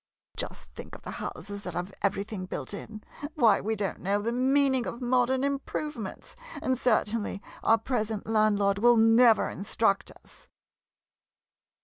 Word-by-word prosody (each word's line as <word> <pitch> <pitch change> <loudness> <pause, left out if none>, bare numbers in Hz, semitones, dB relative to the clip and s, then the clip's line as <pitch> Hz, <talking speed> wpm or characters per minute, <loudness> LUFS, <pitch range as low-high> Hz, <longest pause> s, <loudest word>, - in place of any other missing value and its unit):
Just - - -6
think - - -9
of - - -13
the - - -6
houses 200 +4 -6
that 180 -4 -7
have 180 +3 -4
everything 200 -1 -2
built - - -5
in 215 +1 -8 0.2
— 290 +1 -7
why, 225 -8 +4
we 220 +2 -1
don't 200 -2 -3
know 200 +2 0
the 225 +3 -2
meaning 265 0 +2
of 235 - -5
modern 255 +1 +2
improvements, 280 -4 -4 0.2
and 260 - 0
certainly 225 -4 0 0.2
our 225 - +4
present 220 -4 -2
landlord 205 -2 +2
will 240 +2 +5
never 225 +1 +5
in - - -7
struct 200 0 0
us. - - -15
220 Hz, 150 wpm, -28 LUFS, 200-250 Hz, 0.2 s, will